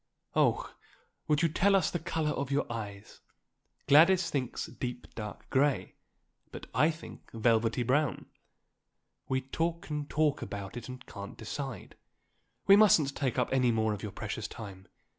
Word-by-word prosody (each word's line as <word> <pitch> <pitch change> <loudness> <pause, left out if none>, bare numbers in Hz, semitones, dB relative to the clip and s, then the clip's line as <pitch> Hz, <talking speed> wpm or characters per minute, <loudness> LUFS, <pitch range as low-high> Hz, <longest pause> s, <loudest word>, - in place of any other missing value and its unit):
Oh, - - +2 0.5
would 150 +2 +2
you - - +5
tell 195 +5 +3
us 185 -5 +2
the 175 - -2
colour 160 -1 -1
of 140 -2 -3
your 140 +1 +1
eyes? 105 -3 -7 0.7
Gladys 170 +4 +6
thinks 130 -4 -2
deep, 125 -1 -6
dark 105 -2 -7
grey, 140 +1 +1 0.6
but - - -8
I 155 - +4
think 165 0 -9
velvety 115 +1 +2
brown; 135 0 +1 1.0
we 130 0 +1
talk 165 +5 -3
and 150 -1 -3
talk 150 -1 +1
about 100 0 -6
it 120 0 -7
and 125 0 -9
can't 100 0 -9
decide. 125 -1 -6 0.7
We 195 - +8
mustn't 165 -10 +5
take 130 -4 -1
up - - +1
any 125 -2 +3
more 110 -1 +1
of 105 - -6
your 105 - -5
precious 110 +2 -4
time. 100 -4 -10
135 Hz, 155 wpm, -30 LUFS, 110-155 Hz, 1.0 s, We